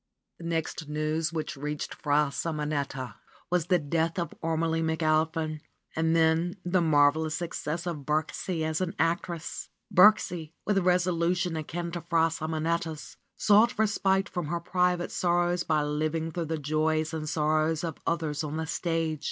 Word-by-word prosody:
The 170 - -8
next 160 -2 -3
news 155 +2 -1
which 160 0 -3
reached 150 +1 -4
Fra 145 -1 +1
Simonetta 145 -5 -3 0.3
was 175 -2 +1
the 180 - +4
death 165 +2 -1
of 170 -1 -2
Ormelie 165 0 0
McAlpin 160 -1 0 0.4
and 160 +1 +2
then 165 +2 +2
the 180 0 +2
marvelous 155 0 +3
suc 175 0 -4
cess 160 +4 -3
of 170 -3 -2
Birksie 155 +3 -2
as 160 +2 -1
an 180 -2 -2
actress. 165 +1 -2 0.2
Birksie, 180 -5 +5
with 200 -1 +2
resolution 180 -1 +1
akin 170 +2 -4
to 175 0 -4
Fra 165 -1 +2
Simonetta's, 160 0 -3 0.2
sought 220 +4 +4
respite 200 -2 +2
from 175 -6 -4
her 170 +2 -1
private 180 0 0
sorrows 175 0 +1
by 155 -2 +1
living 155 +2 -1
through 170 0 -3
the 160 +1 -2
Joys 155 +2 0
and 155 -1 -3
sorrows 155 +1 +1
of 165 -3 -4
others 160 -3 -1
on 150 +1 -3
the 160 - -2
stage. 165 -2 -1
160 Hz, 150 wpm, -28 LUFS, 155-175 Hz, 0.4 s, Birksie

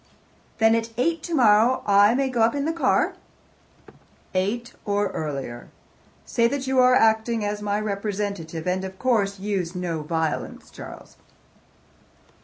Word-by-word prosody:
"Then 225 0 +4
at 230 0 0
eight 330 +6 0
tomorrow 245 -6 +3
I 205 +2 +5
may 270 +1 +1
go 250 -3 -1
up 230 +4 +3
in 280 0 -1
the 325 - 0
car?" 335 - +1 1.2
"Eight 220 +7 -2
or 205 0 0
earlier. 135 -6 -5 0.6
Say 235 -1 +2
that 275 +2 -3
you 265 0 +1
are 250 0 +6
acting 220 0 +2
as 205 0 -3
my 205 0 -1
representative, 200 -5 -4
and, 185 +1 0
of 190 0 -7
course, 200 -6 0
use 190 -3 -3
no 175 -3 -3
violence, 160 0 -3
Charles." - - -11
210 Hz, 140 wpm, -24 LUFS, 190-240 Hz, 1.2 s, are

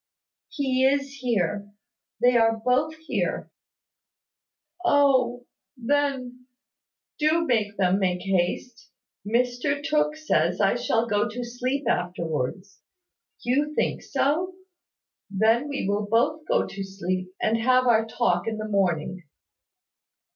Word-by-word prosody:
"He 260 -3 0
is 275 +1 +1
here, 205 -5 -1 0.5
they 245 +1 +4
are 225 -1 +3
both 275 +5 +2
here." 320 0 -3 1.3
"Oh, 260 -6 +3 0.3
then, 255 -1 -1 0.7
do 315 +2 +2
make 215 -6 0
them 190 0 +2
make 180 -2 0
haste. 195 +6 -2 0.3
Mr 245 +6 0
Tooke 300 0 +1
says 310 0 0
I - - +3
shall 230 +1 0
go 210 0 0
to 245 +3 -5
sleep 250 +4 -3
afterwards. 175 0 -2 0.6
You 290 +5 0
think - - 0
so? 350 +7 0 0.7
Then 220 +7 +2
we 280 -8 -3
will 205 +1 -1
both 295 +8 +1
go - - +2
to 195 - -6
sleep, 185 -1 -3
and 225 +1 +1
have 255 +2 +3
our 225 -2 +3
talk 225 -6 0
in 220 -1 -2
the 215 0 -4
morning. 185 -3 0
240 Hz, 120 wpm, -25 LUFS, 200-275 Hz, 1.3 s, they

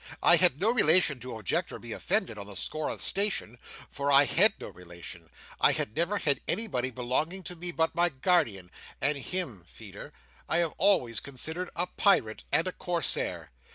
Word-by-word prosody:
I - - +8
had 135 - +4
no 215 +3 +2
relation 170 - +3
to 125 -1 -8
object 105 -4 -2
or - - -7
be - - -11
offended, 115 - -2
on 100 - -8
the 100 - -9
score 155 +10 -2
of - - -4
station; 195 - +1 0.3
for 140 0 -3
I 140 +1 +6
had 200 - +3
no - - -8
relation. 85 -1 -12 0.3
I - - +4
have 105 - -3
never 175 +5 0
had 145 -7 0
anybody 130 - -1
belonging 130 +9 -3
to 180 +1 -6
me 175 +1 -6
but 160 -1 0
my 175 +1 +2
guardian, 130 - 0 0.3
and 145 +2 +1
him, 140 - -5
Feeder, - - -11 0.4
I 160 - +2
have 170 -2 0
always 160 - +2
considered 160 +7 -5
as 170 - 0
a - - -4
Pirate 115 - +2
and 165 +4 +2
a - - -2
Corsair. 175 -5 -1
155 Hz, 190 wpm, -28 LUFS, 120-180 Hz, 0.4 s, I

